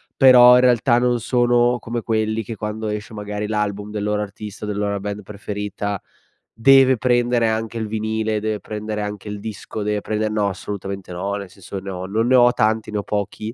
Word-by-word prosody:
però 125 -2 +8
in 125 - +5
realtà 120 -1 +4
non 120 0 +2
sono 120 +1 +2
come 115 +1 -4
quelli 110 0 0
che 110 +2 -6
quando 110 0 -4
esce 105 +1 -5
magari 105 0 -4
l'album 105 -1 -2
del 105 -1 -3
loro 105 0 0
artista, 105 +1 -7
della 105 0 -2
loro 100 0 -2
band 105 +1 -5
preferita 100 0 -5 0.6
deve 135 +2 +6
prendere 120 0 +2
anche 110 +1 -2
il 110 - -2
vinile, 110 0 -1
deve 110 0 -3
prendere 105 0 -4
anche 105 0 -5
il 105 0 -5
disco, 110 0 -6
deve 105 0 0
prender 110 +1 -2
no, 105 -1 +1
assolutamente 100 -1 -6
no, 90 +3 -3
nel 100 -2 -5
senso 95 +1 -8
ne 95 +1 -8
ho 90 -1 -5
non 110 +5 0
ne 130 - +4
ho 120 -1 +6
tanti, 110 0 0
ne 105 - -1
ho - - -4
pochi, 105 +2 -3
105 Hz, 200 wpm, -21 LUFS, 105-115 Hz, 0.6 s, però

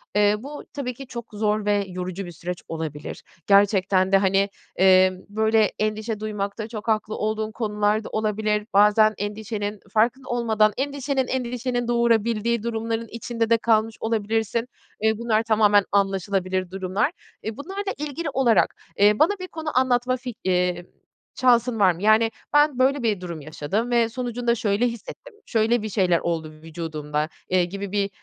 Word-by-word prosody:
eee, 210 0 +4
bu 290 +4 -8
tabii 260 -3 -3
ki 270 +2 -10
çok 235 -2 -7
zor 210 0 0
ve 205 -1 +1
yorucu 185 +1 -5
bir 175 - -8
süreç 175 +2 -6
olabilir. 155 -2 -6 0.2
Gerçekten 195 -2 +4
de, 195 - +7
hani, 195 +1 +2 0.3
emm, 185 0 +5
böyle, 220 0 +2
endişe 215 0 -2
duymakta 210 0 -4
çok 220 -1 -8
haklı 215 -1 0
olduğun 215 0 -2
konular 210 -1 0
da - - -8
olabilir. 215 0 -1
Bazen 210 +2 +5
endişenin 205 0 -4
farkında 245 +4 +1
olmadan 220 -3 +2
endişenin 275 -1 -1
endişenin 245 -1 -2
doğurabildiği 235 -1 +1
durumların 230 0 -2
içinde 230 0 -2
de 230 - +5
kalmış 225 -1 +1
olabilirsin. 225 +1 -1 0.3
Eee, 220 -1 +2
bunlar 225 -2 +1
tamamen 210 -2 +4
anlaşılabilir 190 -2 0
durumlar. 190 +2 -1 0.3
Eee, 220 0 -5
bunlarla 390 +6 -4
ilgili 300 +2 -4
olarak, 255 -6 +2 0.2
eee, 205 +1 +4
bana 325 +6 +5
bir 370 - -6
konu 315 -5 -4
anlatma 255 0 +2
fik 245 -3 -8
iii, 180 -1 0 0.6
şansın 245 -2 +3
var 190 -3 +6
mı? 175 +2 -8
Yani, 220 +2 +4 0.2
"Ben, 295 -3 +4
böyle 270 +1 +2
bir 210 -5 0
durum 170 -3 -6
yaşadım 160 - -3
ve 235 -1 +3
sonucunda 240 -1 -1
şöyle 215 +2 +1
hissettim, 235 - -8
şöyle 225 +1 +1
bir 215 - -4
şeyler 185 -4 +2
oldu 160 -2 -3
vücudumda." 155 -1 -4 0.2
eee, 180 -1 +3
gibi 200 +2 -6
bir, 200 -1 0
215 Hz, 155 wpm, -24 LUFS, 195-235 Hz, 0.6 s, de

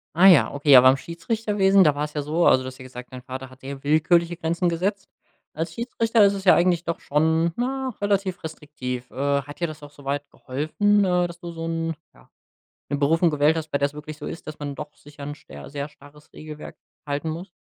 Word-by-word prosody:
Ah 180 +4 +7
ja, 175 -7 +6
okay, 145 0 +5
aber 130 0 +9
beim 135 - +4
Schiedsrichterwesen, 195 - +2
da 150 -2 +4
war's 150 +1 -3
ja 150 - -2
so 155 +4 0
also, 130 - +5
du 130 - -6
hast 130 - -8
ja - - -11
gesagt: 125 0 -10
„Dein 130 - -7
Vater 130 +1 -7
hat 130 0 -18
sehr 135 0 -7
willkürliche 170 +3 +3
Grenzen 170 +1 -1
gesetzt“. 190 +4 -1 0.5
Als 165 +2 -4
Schiedsrichter 230 -1 +1
ist 200 - +3
es 195 -1 -5
ja 185 - +7
eigentlich 175 -1 +2
doch 170 -1 -3
schon, 160 +3 +1
na, 260 0 -2
relativ 200 -3 0
restriktiv. 130 -6 -6
Äh, - - -17 0.3
hat 145 +1 -11
dir 170 - +1
das 155 -1 -9
auch 145 - -9
so 145 -1 -16
weit 140 +1 -3
geholfen, 200 - +1
äh, 180 -1 +2
dass 170 0 -11
du 175 -1 -7
so 165 0 -5
'n 165 0 -2 0.2
ja, - - -22 0.6
'ne 145 - -1
Berufung 165 +5 +3
gewählt 150 +2 +3
hast, 160 -1 -4
bei - - 0
der's 140 +1 0
wirklich 150 0 -8
so 150 - -10
ist, 165 - -7
dass 155 - -7
man 145 -1 -5
doch 150 +1 -8
sicher 145 0 -14
'n 145 - -5
scher 70 - -12
sehr 140 0 -5
starres 145 +1 -18
Regelwerk 155 -1 -10 0.3
halten 145 +2 -2
muss? 165 +4 -5
155 Hz, 230 wpm, -24 LUFS, 145-175 Hz, 0.6 s, aber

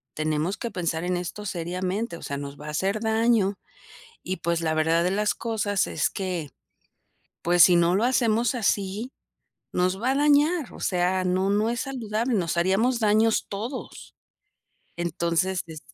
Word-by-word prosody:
tenemos 155 +5 -1
que 235 - -4
pensar 170 -3 -2
en 180 0 0
esto 180 +4 -5
seriamente, 185 +3 -3
o - - -13
sea, 140 - -4
nos 140 0 -7
va 150 - -9
a - - -4
hacer 195 +7 -1
daño, 220 -2 +2 0.7
y 185 - -3
pues, 170 0 -1
la 160 -1 0
verdad 165 +2 +2
de 180 - +1
las 210 +1 +1
cosas 215 -4 -1
es 150 - 0
que, 180 -6 -4 0.9
pues 175 0 +5
si 175 +2 +6
no 170 +1 +3
lo 205 - +1
hacemos 235 -2 +2
así 210 +1 -1 0.6
nos 185 +2 0
va 255 +3 +2
a - - 0
dañar, 295 +2 +3
o - - -11
sea, 185 0 +1
no 185 +1 +1
no 210 +2 +2
es 235 0 -2
saludable, 240 -2 -2
nos 170 -4 -1
haríamos 205 +8 +2
daños 220 0 +3
todos". 230 +7 -6 0.8
Entonces, 170 +2 0
es 160 -2 -9
190 Hz, 165 wpm, -25 LUFS, 170-225 Hz, 0.9 s, si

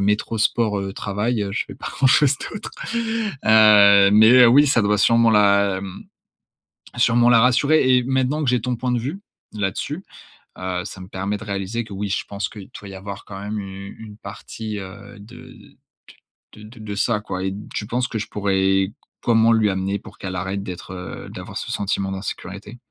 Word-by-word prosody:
métro, 105 +3 0
sport, 110 -1 +1
heu, 95 0 -5
travail. 105 +3 -2
Heu, 100 - -3
je - - -1
fais - - -10
pas - - -7
grand 135 - +1
chose 140 +1 +4 0.2
d'autre! 210 - -7 0.7
Heu, 105 -2 +7
mais, 110 +2 +7
heu, - - +8
oui 145 +5 +6
ça 120 -5 +3
doit 105 0 +1
sûrement 115 +2 +4
la 100 -2 +3
mmh 95 0 -9 0.9
sûrement 120 0 +3
la 115 - +6
rassurer. 130 +2 +4
Et 125 - +2
maintenant 130 +3 0
que 125 - +2
j'ai 125 -2 +1
ton 125 +1 -2
point 125 +1 -2
de 120 - +1
vue 145 - -5 0.3
là-dessus, 105 - -3 0.6
heu, 90 -1 -3
ça 95 - -8
me 90 - -10
permet 100 +2 -3
de 115 - -10
réaliser 100 +3 -3
que 100 - -10
oui, 100 +1 -4
je - - -1
pense 100 0 -4
qu'il 105 -4 -11
doit 100 - -11
y 95 - -9
avoir 100 +1 -8
quand 95 -2 -9
même 105 +1 -4
une 95 0 -8
une 105 -2 -11
partie, 105 +1 -7
heu, 100 +1 -10
de 110 +4 -13
d - - -19 0.8
de 105 - -13
de 110 +2 -13
de 105 -1 -6
ça 105 0 0
quoi, 95 -2 -5
et 95 - -2 0.2
tu 105 - -4
penses 125 +2 -1
que 110 - -4
je - - -5
pourrais 95 -1 +1 0.3
comment 115 -1 +4
lui 110 -2 +3
amener, 95 +1 -2
pour 110 +1 -14
qu'elle 95 -3 -5
arrête 95 +2 -3
d'être 90 -1 -8
heu 90 0 -8
d'avoir - - -9
ce - - -5
sentiment 100 -1 -2
d'insécurité? 100 +2 -7
105 Hz, 200 wpm, -21 LUFS, 100-115 Hz, 0.9 s, heu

